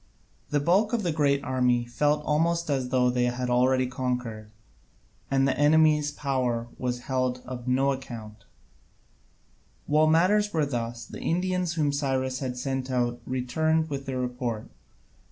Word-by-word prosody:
The 145 - +1
bulk 190 - +2
of 230 -3 0
the 175 - 0
great 140 -2 +1
army 125 -3 +1
felt 150 +5 0
almost 165 +1 +1
as 130 -3 -1
though 125 -1 +3
they 125 0 +1
had 125 0 -2
already 130 +1 +3
conquered, 125 -4 -3 0.8
and 135 0 +2
the 130 - +1
enemy's 150 0 +4
power 130 -5 -1
was 125 -1 -2
held 130 -1 -1
of 125 -1 -7
no 135 +2 +2
account. 115 -5 -7 1.4
While 155 +1 +3
matters 195 +6 +3
were 155 -2 +2
thus, 120 -3 -4
the - - -9
Indians 180 0 0
whom 150 -3 +1
Cyrus 130 -2 -1
had 125 -2 -4
sent 135 0 -3
out 120 -1 -1
returned 155 +5 0
with 140 -1 -4
their 130 -1 -2
report. 125 -3 -3
130 Hz, 150 wpm, -27 LUFS, 125-150 Hz, 1.4 s, enemy's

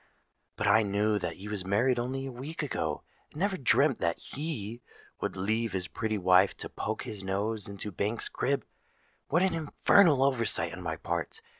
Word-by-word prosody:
But - - -2
I 110 - +6
knew 105 +1 +1
that 85 -3 -3
he 100 - -9
was 105 -3 -1
married 120 +6 +2
only 130 +3 -2
a 135 - -5
week 140 +7 -6
ago, 80 - -2 0.3
and 150 - -10
never 195 +1 +1
dreamt 140 -3 +3
that 85 0 0
he 120 -7 -5 0.4
would - - -3
leave 110 +3 0
his 90 -2 -2
pretty 110 -1 -2
wife 90 -1 +4
to - - -6
poke 110 0 -3
his 105 -3 -6
nose 100 +3 -2
into 100 +1 -6
Banks's 105 +5 -1
crib. 140 +1 -1 0.6
What 170 +5 +3
an 190 - +2
infernal 160 -1 +4
oversight 130 -4 +2
on - - -7
my - - -2
part! - - -3
110 Hz, 180 wpm, -30 LUFS, 100-135 Hz, 0.6 s, I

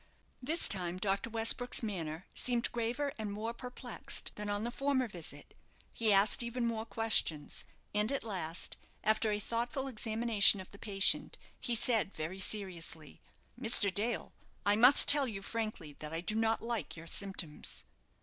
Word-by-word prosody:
This 310 +7 +2
time 180 -2 +2
Dr. 195 +3 -1
Westbrook's 230 +2 +1
manner 170 -5 -4
seemed 240 -2 +1
graver 240 +5 -2
and 215 -2 -4
more 220 +3 -4
perplexed 250 0 -4
than 210 0 -6
on 205 +1 -1
the 240 - -3
former 275 -1 0
visit. 165 -7 -8 0.4
He 225 -2 +1
asked 200 +3 +4
even 235 +1 -3
more 225 -1 -3
questions, 200 -9 +1 0.3
and 210 +3 +1
at 275 - -2
last, 180 -6 -3 0.3
after 220 +1 +2
a 210 - -1
thoughtful 240 +5 -3
examination 220 -4 +4
of 185 - -10
the 200 - -13
patient, 195 -3 +2 0.2
he 240 - -1
said, 220 -3 +1
very 165 +5 -5
seriously 180 -6 -4 0.4
"Mr. 220 -5 +3
Dale, 225 +4 -2 0.3
I 205 0 +4
must 250 +6 +8
tell 285 -2 +7
you 195 -4 -6
frankly 215 -9 -4
that 150 0 -6
I 165 +1 -4
do 200 - 0
not 225 +1 0
like 230 -9 -3
your 165 - -10
symptoms." 185 -4 -3
215 Hz, 160 wpm, -33 LUFS, 195-235 Hz, 0.4 s, must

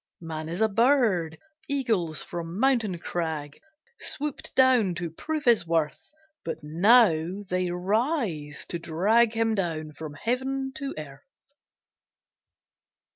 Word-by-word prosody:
Man 160 -1 -6
is 175 +5 -3
a 220 - +5
bird: 220 - +2 0.3
Eagles 220 - 0
from 170 +2 -6
mountain 235 -8 +2
crag 160 -4 -4 0.4
Swooped 295 -1 -4
down 250 -8 +4
to 170 -1 -4
prove 305 - -4
his 230 -8 +4
worth; 160 -2 -1 0.3
But 160 -1 -5
now 180 +1 +4
they 180 0 0
rise 185 - -1
to 170 - -3
drag 205 +8 +2
Him 225 0 +1
down 160 -6 -2
from 150 0 -8
Heaven 265 - -2
to 275 -2 -4
earth! 140 -3 -8
180 Hz, 120 wpm, -26 LUFS, 160-235 Hz, 0.4 s, a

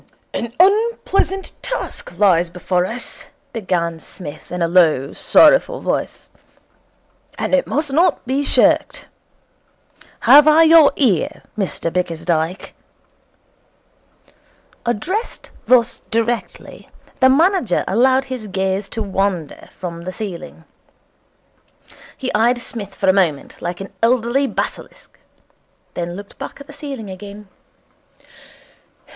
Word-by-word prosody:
'An 235 0 -3
unpleasant 390 -1 +2
task - - -5
lies 180 -4 +3
before 180 +1 -1
us,' 240 +4 -6 0.3
began 175 -7 -2
Psmith 155 -1 -10
in 180 -1 -2
a - - +2
low, 160 -5 +3
sorrowful - - +4
voice, - - -3 1.1
'and - - -3
it 275 - +3
must 295 -1 -2
not 340 +5 +2
be 265 +3 0
shirked. - - +2 1.2
Have 295 +1 +7
I 310 +2 +7
your 320 -2 +7
ear, 220 - 0
Mr 185 -5 -3
Bickersdyke?' 170 0 -2 2.1
Addressed 350 - -3
thus 245 -2 +3
directly, 230 +1 -3 0.3
the 260 - +6
manager 320 - +2
allowed 260 +6 +3
his 255 -5 -6
gaze 190 +1 -2
to 225 - -3
wander 195 -5 -3
from 170 -2 -6
the 185 - -4
ceiling. 185 -5 -7 1.5
He 260 - -4
eyed 235 +3 +3
Psmith 210 -5 -8
for 195 - -2
a 190 - +6
moment 170 -8 -1
like 175 0 -4
an 195 0 -8
elderly 245 +3 +2
basilisk, - - -6 0.7
then 175 0 -4
looked 200 +1 -11
back - - -7
at 280 - -11
the 290 - -13
ceiling 275 -8 -7
again. 200 +2 -10
215 Hz, 115 wpm, -19 LUFS, 180-270 Hz, 2.1 s, Have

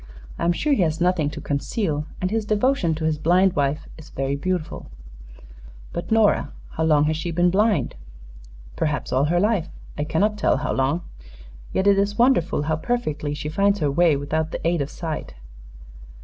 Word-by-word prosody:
I - - -1
am 170 - +4
sure 285 - +1
he 220 - +2
has 160 -1 +1
nothing 175 -4 +2
to - - -7
conceal, 150 - -2
and 185 +1 -1
his 225 0 0
devotion 210 - +1
to 160 - -5
his 155 -1 0
blind 180 +4 +3
wife 145 +2 0
is 160 - -12
very 135 +1 -2
beautiful." 175 +2 -3 1.0
"But 170 - -5
Nora 215 -9 +3 0.2
how 160 - -1
long 150 -2 +4
has 155 +1 +1
she 160 +2 -4
been 175 +1 +2
blind?" 200 - +2 0.8
"Perhaps 145 - -2
all 130 +2 +3
her 175 +3 +2
life; 200 -4 +1 0.3
I - - +1
cannot 200 +8 0
tell - - +2
how 145 - -2
long. 140 +6 0 0.7
Yet 190 - 0
it 200 -1 +5
is 205 +1 0
wonderful 235 - +3
how 155 +1 0
perfectly 155 -9 -2
she 150 0 -5
finds 200 +6 +2
her 150 -6 0
way 165 +1 +4
without 155 +3 -1
the 165 - -3
aid 170 -2 +1
of 140 - -3
sight. 160 - -5
165 Hz, 185 wpm, -23 LUFS, 150-195 Hz, 1.0 s, it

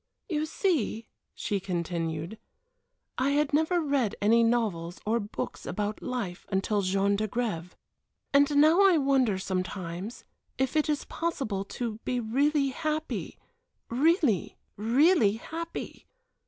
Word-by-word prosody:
"You 310 -3 -1
see," 300 - 0 0.3
she 205 - -1
continued, 170 0 -3 0.8
"I 260 +2 +2
had 295 0 +1
never 320 +4 +3
read 280 -9 0
any 225 +3 +4
novels, 205 -8 0
or 225 +3 +2
books 205 -1 -5
about 210 0 -3
life 225 -9 -4
until 200 +1 +1
Jean 195 +1 +2
d'Agrève. 205 -5 -2 0.6
And 285 +1 +4
now 315 +6 +6
I 385 -4 +6
wonder 270 -8 +2
sometimes 185 +1 -4 0.3
if 265 +2 0
it 305 0 +2
is 295 -1 0
possible 270 -12 -2
to 225 +1 -4
be 250 -1 -1
really 275 +5 +2
happy 310 +3 -3 0.5
really, 280 - +2 0.2
really 235 - +4
happy?" 330 +9 -6
235 Hz, 120 wpm, -28 LUFS, 200-295 Hz, 0.8 s, now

